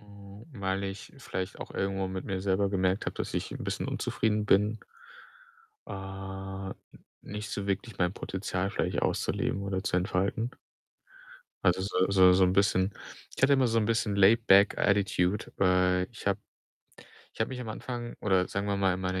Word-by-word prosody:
ähm, 100 Hz, 0 st, -13 dB
weil 100 Hz, -3 st, -2 dB
ich 95 Hz, 0 st, -6 dB
vielleicht 95 Hz, 0 st, -5 dB
auch -, -, -7 dB
irgendwo 95 Hz, 0 st, -1 dB
mit 95 Hz, 0 st, -5 dB
mir 95 Hz, -1 st, -3 dB
selber 100 Hz, +1 st, +1 dB
gemerkt 95 Hz, 0 st, 0 dB
habe, -, -, -2 dB
dass -, -, -4 dB
ich -, -, -2 dB
'n -, -, -6 dB
bisschen -, -, -3 dB
unzufrieden 105 Hz, -1 st, 0 dB
bin 105 Hz, +2 st, +3 dB, 1.1 s
äh, -, -, -6 dB, 0.8 s
n -, -, -6 dB, 0.5 s
nicht 105 Hz, +1 st, -6 dB
so 100 Hz, 0 st, -3 dB
wirklich 100 Hz, +1 st, -3 dB
mein 90 Hz, 0 st, +2 dB
Potenzial 95 Hz, -1 st, -3 dB
vielleicht 90 Hz, -4 st, -1 dB
auszuleben 100 Hz, -, 0 dB
oder 95 Hz, -1 st, -2 dB
zu 95 Hz, -, 0 dB
entfalten. 95 Hz, +6 st, 0 dB, 1.1 s
Also, 90 Hz, 0 st, +4 dB
so 95 Hz, -1 st, +1 dB
so 95 Hz, -2 st, +7 dB
so 95 Hz, +1 st, +5 dB
'n 90 Hz, -, +2 dB
bisschen 95 Hz, 0 st, +2 dB, 0.4 s
ich -, -, -7 dB
hatte 140 Hz, +1 st, +6 dB
immer 130 Hz, -2 st, +3 dB
so 115 Hz, -1 st, +2 dB
'n 105 Hz, -, +1 dB
bisschen 115 Hz, -2 st, +1 dB
laid 110 Hz, +4 st, +5 dB
back 100 Hz, +2 st, +6 dB
attitude, 100 Hz, -1 st, +1 dB
äh, 90 Hz, -1 st, +3 dB
ich 115 Hz, -, -12 dB
habe 100 Hz, 0 st, +2 dB, 0.9 s
ich -, -, -17 dB
habe 110 Hz, -, +2 dB
mich 130 Hz, -1 st, -5 dB
am 120 Hz, -, -6 dB
Anfang 120 Hz, +2 st, -5 dB
oder 95 Hz, -3 st, +2 dB
sagen 100 Hz, +1 st, -2 dB
wir 100 Hz, -1 st, 0 dB
mal 95 Hz, -2 st, +2 dB
in 95 Hz, -, -5 dB
meiner 95 Hz, 0 st, -1 dB
100 Hz, 180 wpm, -29 LUFS, 95-105 Hz, 1.1 s, so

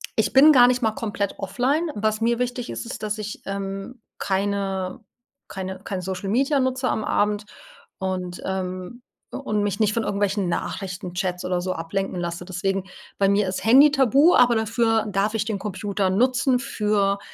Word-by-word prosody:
ich -, -, +1 dB
bin 290 Hz, +4 st, +8 dB
gar 245 Hz, -3 st, +7 dB
nicht 250 Hz, 0 st, +1 dB
mal 220 Hz, -1 st, +2 dB
komplett 205 Hz, -2 st, -3 dB
offline. 265 Hz, -, 0 dB
Was 215 Hz, +1 st, -1 dB
mir 235 Hz, +1 st, +1 dB
wichtig 245 Hz, 0 st, -3 dB
ist, -, -, -5 dB
ist, 230 Hz, -2 st, -7 dB
dass 215 Hz, +1 st, -2 dB
ich, 210 Hz, -1 st, -6 dB
ähm, 195 Hz, +4 st, -5 dB, 0.2 s
keine 195 Hz, 0 st, -1 dB, 0.5 s
keine 190 Hz, -1 st, -6 dB
kein 190 Hz, -1 st, -5 dB
Social 190 Hz, +1 st, -4 dB
Media 275 Hz, +5 st, +2 dB
nutze 260 Hz, 0 st, 0 dB
am 220 Hz, -, -1 dB
Abend 210 Hz, 0 st, 0 dB, 0.5 s
und, 185 Hz, -2 st, -3 dB
ähm 185 Hz, +3 st, -4 dB, 0.3 s
u -, -, -3 dB
und 210 Hz, -6 st, -1 dB
mich 205 Hz, +1 st, -1 dB
nicht 215 Hz, 0 st, +3 dB
von 230 Hz, -, 0 dB
irgendwelchen 200 Hz, -1 st, 0 dB
Nachrichtenchats 180 Hz, 0 st, -3 dB
oder 180 Hz, -1 st, -1 dB
so 185 Hz, +1 st, -2 dB
ablenken 180 Hz, +4 st, -3 dB
lasse. 175 Hz, 0 st, -4 dB
Deswegen 195 Hz, +1 st, -2 dB, 0.3 s
bei 195 Hz, -, +3 dB
mir 200 Hz, -1 st, +2 dB
ist 185 Hz, -, -3 dB
Handy 275 Hz, +6 st, +7 dB
tabu, 275 Hz, +4 st, +4 dB
aber 245 Hz, -1 st, +5 dB
dafür 225 Hz, 0 st, +1 dB
darf 200 Hz, +2 st, 0 dB
ich 220 Hz, -1 st, 0 dB
den 215 Hz, -3 st, -3 dB
Computer 200 Hz, -1 st, -2 dB
nutzen 255 Hz, +5 st, +2 dB
für 210 Hz, -6 st, 0 dB
205 Hz, 175 wpm, -23 LUFS, 190-235 Hz, 0.5 s, bin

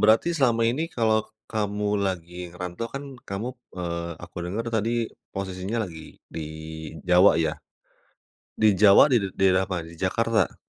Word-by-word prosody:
berarti 110 Hz, +11 st, +4 dB
selama 125 Hz, -7 st, +2 dB
ini 135 Hz, +9 st, +1 dB
kalau 110 Hz, -7 st, +2 dB, 0.2 s
kamu 105 Hz, -2 st, -2 dB, 0.2 s
lagi 90 Hz, -1 st, -4 dB
ngerantau 90 Hz, +5 st, -5 dB
kan 135 Hz, +4 st, -6 dB, 0.3 s
kamu, 100 Hz, +4 st, -3 dB, 0.3 s
eee, 85 Hz, -1 st, -3 dB
aku -, -, -19 dB
denger 100 Hz, +6 st, -3 dB
tadi 110 Hz, 0 st, +1 dB, 0.4 s
posisinya 95 Hz, +4 st, -2 dB
lagi 80 Hz, -4 st, -10 dB, 0.2 s
di -, -, -3 dB, 0.7 s
Jawa 90 Hz, +2 st, +7 dB
ya? 80 Hz, -, 0 dB, 1.0 s
Di 110 Hz, -, +4 dB
Jawa 100 Hz, -2 st, +9 dB
di -, -, +5 dB
did 95 Hz, -, -11 dB
daerah 95 Hz, -1 st, +4 dB
mana? 90 Hz, -3 st, -2 dB
Di 85 Hz, -, -14 dB
Jakarta? 110 Hz, +1 st, +1 dB
100 Hz, 145 wpm, -25 LUFS, 90-115 Hz, 1.0 s, Jawa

